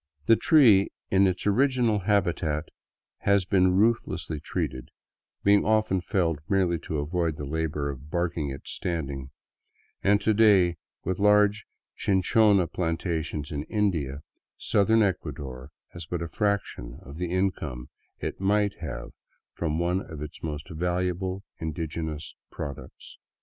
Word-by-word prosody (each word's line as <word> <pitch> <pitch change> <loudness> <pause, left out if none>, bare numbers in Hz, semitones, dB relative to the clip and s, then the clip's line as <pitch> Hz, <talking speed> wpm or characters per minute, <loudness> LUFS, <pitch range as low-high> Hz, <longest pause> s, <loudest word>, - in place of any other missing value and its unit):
The 115 - +6
tree 115 -10 +5 0.2
in 95 0 +5
its 90 0 -2
original 120 0 +3
habitat 90 -6 0 0.5
has 100 -2 +2
been 95 -1 +3
ruthlessly 105 -7 +1
treated, 65 -2 -4 0.5
being 100 0 +5
often 110 -4 +2
felled 85 -5 0
merely 90 -4 +2
to 80 -1 -4
avoid 80 +2 -1
the 75 - -5
labor 75 -1 -2
of 70 +2 -11
barking 85 -3 -1
it 70 0 -8
standing, 70 -6 -4 0.7
and 100 +1 +4
to 110 +1 +2
day, 100 -6 +5 0.3
with 95 0 -1
large 105 0 +4 0.3
chinchona 100 0 +3
plantations 80 -3 -2
in 70 -2 -2
India, 80 - -1 0.3
southern 110 +2 +3
Ecuador 65 -9 -3 0.2
has 85 -2 -9
but 85 0 -3
a - - -4
fraction 95 - -2
of 70 +4 -10
the 90 0 -2
income 80 -10 -2 0.3
it - - -5
might 100 +1 +1
have 80 -8 -6 0.4
from 80 -2 -2
one 90 +2 +1
of 80 -6 -9
its 75 0 -8
most 75 -2 -5
valuable 90 +3 -2 0.2
indigenous 80 -1 -4 0.2
products. 70 -2 -8
90 Hz, 130 wpm, -27 LUFS, 75-100 Hz, 0.7 s, The